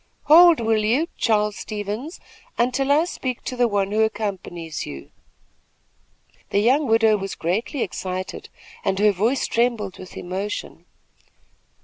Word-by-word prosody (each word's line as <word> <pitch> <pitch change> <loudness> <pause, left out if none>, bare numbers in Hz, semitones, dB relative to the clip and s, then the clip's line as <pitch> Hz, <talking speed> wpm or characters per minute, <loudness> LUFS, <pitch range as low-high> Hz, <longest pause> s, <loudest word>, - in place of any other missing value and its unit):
"Hold, 335 +1 +7
will 220 -2 +1
you, 255 +10 +1
Charles 210 -2 +1
Stevens, 215 - -5 0.4
until 255 +3 +1
I 305 +4 +4
speak 255 -8 -5
to 255 - -4
the 245 -1 +3
one 200 -2 0
who 215 +1 +2
accompanies 190 -7 -3
you." 70 - -9 1.4
The - - 0
young 260 +8 +3
widow 225 -1 +4
was 195 0 -5
greatly 215 - -2
excited, 185 0 -5 0.3
and 195 -1 0
her 210 +1 +4
voice 225 +8 0
trembled 230 -5 -1
with 185 - -11
emotion. 195 +3 -5
215 Hz, 130 wpm, -22 LUFS, 195-250 Hz, 1.4 s, Hold